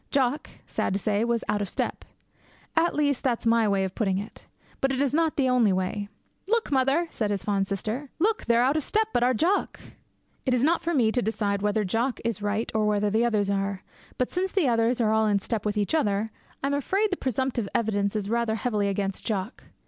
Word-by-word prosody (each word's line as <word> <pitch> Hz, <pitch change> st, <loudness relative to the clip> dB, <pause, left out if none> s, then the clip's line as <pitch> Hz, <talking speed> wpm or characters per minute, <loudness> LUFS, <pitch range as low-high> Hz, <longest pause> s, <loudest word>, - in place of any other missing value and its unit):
Jock, 275 Hz, +1 st, 0 dB, 0.2 s
sad 190 Hz, -, -1 dB
to -, -, 0 dB
say, 205 Hz, +2 st, 0 dB
was 235 Hz, -1 st, 0 dB
out 205 Hz, 0 st, 0 dB
of 200 Hz, -, -3 dB
step. -, -, -3 dB, 0.7 s
At 335 Hz, +1 st, +2 dB
least 285 Hz, -3 st, +1 dB
that 245 Hz, -3 st, 0 dB
is -, -, -11 dB
my 230 Hz, -1 st, +4 dB
way 200 Hz, -1 st, +2 dB
of 190 Hz, -1 st, -3 dB
putting 195 Hz, -4 st, 0 dB
it. 205 Hz, +3 st, -8 dB, 0.3 s
But 270 Hz, -, +1 dB
it 265 Hz, -, -1 dB
is 280 Hz, -1 st, +1 dB
not 320 Hz, 0 st, +2 dB
the 270 Hz, -2 st, +2 dB
only 245 Hz, -5 st, +4 dB
way. 190 Hz, +2 st, -2 dB, 0.4 s
'Look, 460 Hz, -4 st, 0 dB
mother!' 275 Hz, +5 st, +2 dB
said 215 Hz, -3 st, -1 dB
his 200 Hz, -1 st, -2 dB
fond 195 Hz, -2 st, 0 dB
sister, 215 Hz, +8 st, -3 dB
'look, 430 Hz, +6 st, +1 dB
they're 235 Hz, 0 st, +4 dB
a' 255 Hz, -, +4 dB
oot 305 Hz, -, 0 dB
o' -, -, +3 dB
step 435 Hz, +8 st, 0 dB
but -, -, +2 dB
our 250 Hz, +1 st, +3 dB
Jock!' 360 Hz, -, 0 dB, 0.6 s
It 255 Hz, -2 st, +2 dB
is 245 Hz, -, +1 dB
not 335 Hz, +4 st, +3 dB
for 340 Hz, 0 st, -1 dB
me 230 Hz, -5 st, +3 dB
to 245 Hz, -, +1 dB
decide 205 Hz, -3 st, -1 dB
whether 210 Hz, +1 st, +1 dB
Jock 230 Hz, +6 st, -1 dB
is 230 Hz, -2 st, -1 dB
right 210 Hz, +2 st, -1 dB
or 215 Hz, -1 st, +1 dB
whether 210 Hz, 0 st, +1 dB
the 220 Hz, +3 st, +2 dB
others 210 Hz, -4 st, +1 dB
are. 195 Hz, -1 st, -2 dB, 0.3 s
But 255 Hz, -, -1 dB
since 370 Hz, +1 st, -1 dB
the 380 Hz, -8 st, +2 dB
others 230 Hz, +1 st, +2 dB
are 220 Hz, -2 st, +2 dB
all 220 Hz, 0 st, +3 dB
in 205 Hz, -1 st, +3 dB
step 215 Hz, +1 st, -2 dB
with 210 Hz, 0 st, -1 dB
each 205 Hz, +5 st, 0 dB
other, 215 Hz, -7 st, +1 dB, 0.3 s
I -, -, +1 dB
am 280 Hz, -, 0 dB
afraid 390 Hz, +9 st, +1 dB
the -, -, +1 dB
presumptive 260 Hz, -, -2 dB
evidence 205 Hz, -2 st, 0 dB
is 205 Hz, -2 st, -2 dB
rather 230 Hz, 0 st, 0 dB
heavily 215 Hz, -2 st, 0 dB
against 195 Hz, -1 st, -2 dB
Jock. 200 Hz, 0 st, -3 dB
230 Hz, 235 wpm, -26 LUFS, 205-270 Hz, 0.7 s, my